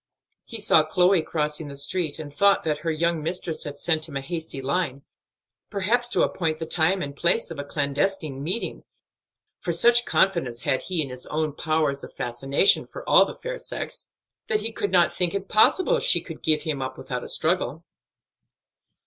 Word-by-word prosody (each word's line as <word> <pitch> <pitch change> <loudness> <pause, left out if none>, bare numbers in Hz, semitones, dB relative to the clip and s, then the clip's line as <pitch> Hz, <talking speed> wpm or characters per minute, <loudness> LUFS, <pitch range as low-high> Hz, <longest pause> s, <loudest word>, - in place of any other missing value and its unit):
He 230 - -7
saw 160 -6 +5
Chloe 180 +3 +3
crossing 150 -1 -2
the 140 - -8
street, 155 +2 -2
and 145 -2 -8
thought 200 +6 +3
that 150 -2 -1
her 165 +1 -3
young 165 +1 0
mistress 165 0 0
had 145 -1 -6
sent 160 +1 0
him 140 - -4
a - - -3
hasty 160 -1 -4
line, 140 0 -2 0.7
perhaps 225 +5 0
to 200 -6 +2
appoint 160 -3 -1
the 160 - -5
time 180 +4 +2
and 140 -1 -6
place 175 +6 +1
of 160 - -7
a - - -3
clandestine 145 +1 -2
meeting; 185 +10 -3 0.8
for 175 - -3
such 240 +8 +4
confidence 165 -11 +1
had 130 - 0
he 175 -4 -1
in 135 - -6
his 125 0 -4
own 155 -1 -2
powers 155 -3 0
of - - -9
fascination 135 +8 +2
for - - -10
all - - +6
the - - -7
fair - - -6
sex, - - -6 0.4
that 430 -2 0
he 225 - -3
could 205 -2 -2
not 180 -2 +3
think 180 0 0
it 195 0 -3
possible 375 - +3
she - - +3
could - - -10
give 155 -1 +2
him 150 -4 -3
up 130 - -5
without - - -5
a - - -7
struggle. - - -1
160 Hz, 190 wpm, -24 LUFS, 145-190 Hz, 0.8 s, all